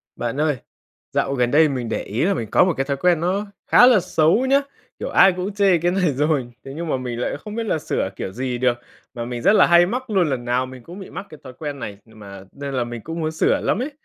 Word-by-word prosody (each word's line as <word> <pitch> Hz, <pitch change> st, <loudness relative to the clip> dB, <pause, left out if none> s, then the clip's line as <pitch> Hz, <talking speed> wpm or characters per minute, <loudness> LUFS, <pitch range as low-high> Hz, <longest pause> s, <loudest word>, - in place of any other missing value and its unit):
Bạn 120 Hz, +5 st, -3 dB
ơi, 150 Hz, -3 st, +1 dB, 0.5 s
dạo 135 Hz, -, 0 dB
gần 125 Hz, -2 st, +1 dB
đây 155 Hz, +1 st, +5 dB
mình 125 Hz, -4 st, -3 dB
để -, -, -2 dB
ý 115 Hz, +10 st, -1 dB
là 200 Hz, -, +2 dB
mình 115 Hz, -, -4 dB
có -, -, +5 dB
một 185 Hz, -, +1 dB
cái 135 Hz, -, 0 dB
thói 140 Hz, 0 st, -2 dB
quen 175 Hz, +1 st, +2 dB
nó 190 Hz, +4 st, 0 dB, 0.2 s
khá 245 Hz, -, +7 dB
là 245 Hz, -5 st, +6 dB
xấu 175 Hz, +6 st, +2 dB
nhá, 275 Hz, +2 st, +4 dB, 0.4 s
kiểu -, -, -4 dB
ai 195 Hz, -, +6 dB
cũng 185 Hz, +3 st, -4 dB
chê 200 Hz, -3 st, +3 dB
cái 175 Hz, +2 st, 0 dB
này 180 Hz, -5 st, +1 dB
rồi. 140 Hz, -3 st, 0 dB
Thế 135 Hz, -, -8 dB
nhưng 170 Hz, +2 st, -4 dB
mà 135 Hz, -, +1 dB
mình 125 Hz, -2 st, -5 dB
lại 125 Hz, -, -2 dB
không 210 Hz, +8 st, -9 dB
biết 230 Hz, -, -2 dB
là 175 Hz, -7 st, 0 dB
sửa 95 Hz, -, -2 dB
kiểu 95 Hz, -, -5 dB
gì 125 Hz, +3 st, -3 dB
được, 120 Hz, -1 st, +1 dB, 0.4 s
mà 120 Hz, -1 st, -5 dB
mình 120 Hz, 0 st, -5 dB
rất 200 Hz, -, +4 dB
là -, -, +6 dB
hay 175 Hz, 0 st, +6 dB
mắc 250 Hz, +5 st, -4 dB
luôn, 185 Hz, -6 st, +2 dB
lần 125 Hz, -3 st, -3 dB
nào 125 Hz, +1 st, 0 dB
mình 130 Hz, -1 st, -11 dB
cũng 175 Hz, +8 st, -10 dB
bị 190 Hz, -, -9 dB
mắc 200 Hz, -, -7 dB
cái 155 Hz, -, -12 dB
thói 130 Hz, -1 st, -10 dB
quen 145 Hz, 0 st, -6 dB
này, 100 Hz, -5 st, -6 dB
nhưng 110 Hz, -1 st, -18 dB
mà 100 Hz, -2 st, -10 dB
nên 140 Hz, 0 st, -6 dB
là 125 Hz, -2 st, 0 dB
mình 120 Hz, -1 st, -7 dB
cũng 165 Hz, +7 st, -6 dB
muốn 155 Hz, 0 st, -1 dB
sửa 160 Hz, -, +1 dB
lắm 215 Hz, -, 0 dB
ấy. 280 Hz, +4 st, -3 dB
150 Hz, 280 wpm, -21 LUFS, 125-180 Hz, 0.5 s, khá